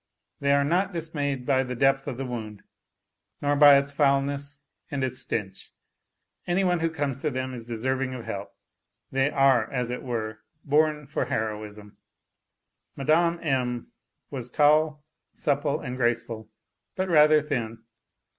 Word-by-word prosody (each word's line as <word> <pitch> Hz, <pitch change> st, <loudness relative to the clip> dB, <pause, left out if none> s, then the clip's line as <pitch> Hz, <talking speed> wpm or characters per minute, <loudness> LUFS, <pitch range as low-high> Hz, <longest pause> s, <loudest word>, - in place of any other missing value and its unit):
They 140 Hz, 0 st, +1 dB
are 140 Hz, 0 st, +4 dB
not 180 Hz, +6 st, +1 dB
dismayed 145 Hz, -6 st, -3 dB
by 130 Hz, -1 st, +3 dB
the 125 Hz, -1 st, -4 dB
depth 135 Hz, +2 st, +2 dB
of 130 Hz, -4 st, -4 dB
the 135 Hz, -, -3 dB
wound, 110 Hz, -5 st, -6 dB, 0.8 s
nor 145 Hz, 0 st, +1 dB
by 145 Hz, -1 st, +8 dB
its 140 Hz, 0 st, -1 dB
foulness 140 Hz, 0 st, 0 dB, 0.3 s
and 140 Hz, -2 st, -2 dB
its 130 Hz, 0 st, -2 dB
stench; 105 Hz, -6 st, -4 dB, 0.8 s
any 180 Hz, +2 st, +2 dB
one 180 Hz, -2 st, +2 dB
who 165 Hz, 0 st, +1 dB
comes 145 Hz, -4 st, -2 dB
to 150 Hz, -, -1 dB
them 130 Hz, -1 st, -3 dB
is 120 Hz, -2 st, -7 dB
deserving 130 Hz, +3 st, -2 dB
of 120 Hz, -, -8 dB
help; 100 Hz, -3 st, -5 dB, 0.6 s
they 135 Hz, +1 st, +2 dB
are, 135 Hz, -6 st, +3 dB
as 125 Hz, -2 st, -2 dB
it 125 Hz, -, -4 dB
were, 110 Hz, -3 st, -4 dB, 0.3 s
born 150 Hz, 0 st, +2 dB
for 140 Hz, -, -2 dB
heroism.... 105 Hz, -1 st, -4 dB, 1.0 s
Mme. 170 Hz, +4 st, +2 dB
M. 125 Hz, -5 st, -1 dB, 0.4 s
was 125 Hz, -3 st, -4 dB
tall, 150 Hz, +2 st, +3 dB, 0.3 s
supple 145 Hz, 0 st, 0 dB
and 125 Hz, -3 st, -5 dB
graceful, 120 Hz, -3 st, -1 dB, 0.5 s
but 190 Hz, 0 st, -1 dB
rather 155 Hz, -2 st, +6 dB
thin. 120 Hz, -7 st, -4 dB
135 Hz, 145 wpm, -26 LUFS, 120-150 Hz, 1.0 s, by